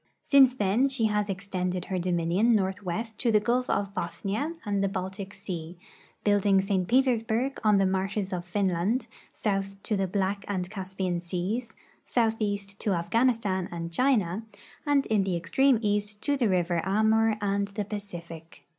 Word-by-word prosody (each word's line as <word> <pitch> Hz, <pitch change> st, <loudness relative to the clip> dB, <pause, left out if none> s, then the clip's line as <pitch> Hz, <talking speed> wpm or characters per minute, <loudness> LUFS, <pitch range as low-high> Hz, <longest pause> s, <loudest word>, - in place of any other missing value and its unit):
Since 265 Hz, -3 st, +6 dB
then 215 Hz, +4 st, +2 dB
she 265 Hz, -4 st, +1 dB
has 210 Hz, -1 st, +1 dB
extended 185 Hz, -2 st, -3 dB
her 185 Hz, -2 st, -2 dB
dominion 180 Hz, +6 st, +2 dB
northwest 200 Hz, +2 st, -2 dB
to 240 Hz, -, +2 dB
the 215 Hz, -, +5 dB
gulf 245 Hz, +4 st, 0 dB
of 200 Hz, -1 st, 0 dB
Bothnia 210 Hz, -, -3 dB
and 200 Hz, -1 st, 0 dB
the 195 Hz, -, +1 dB
Baltic 190 Hz, +1 st, -5 dB
sea, 180 Hz, -4 st, -6 dB, 0.5 s
building 205 Hz, -1 st, +4 dB
St. 190 Hz, -2 st, 0 dB
Petersburg 250 Hz, +1 st, +1 dB
on 210 Hz, -2 st, +5 dB
the 195 Hz, -, +3 dB
marshes 190 Hz, +1 st, -1 dB
of 175 Hz, -1 st, -2 dB
Finland, 190 Hz, +5 st, 0 dB, 0.3 s
south 195 Hz, -2 st, -2 dB
to 215 Hz, -, 0 dB
the 195 Hz, -1 st, 0 dB
Black 195 Hz, +1 st, -1 dB
and 185 Hz, -3 st, -2 dB
Caspian 190 Hz, -3 st, -3 dB
seas, 190 Hz, +7 st, -3 dB, 0.3 s
southeast 205 Hz, -4 st, -1 dB
to 205 Hz, -, 0 dB
Afghanistan 195 Hz, +1 st, +1 dB
and 170 Hz, -1 st, -5 dB
China, 215 Hz, -5 st, +2 dB, 0.5 s
and 285 Hz, -1 st, +3 dB
in 215 Hz, -3 st, +2 dB
the 190 Hz, -2 st, -1 dB
extreme 255 Hz, +10 st, +3 dB
east 205 Hz, 0 st, 0 dB
to 285 Hz, -, +2 dB
the 245 Hz, -6 st, +1 dB
river 175 Hz, -2 st, +1 dB
Amur 220 Hz, +2 st, +3 dB
and 200 Hz, 0 st, 0 dB
the 205 Hz, +1 st, -4 dB
Pacific. 170 Hz, -6 st, -8 dB
200 Hz, 155 wpm, -27 LUFS, 185-220 Hz, 0.5 s, Since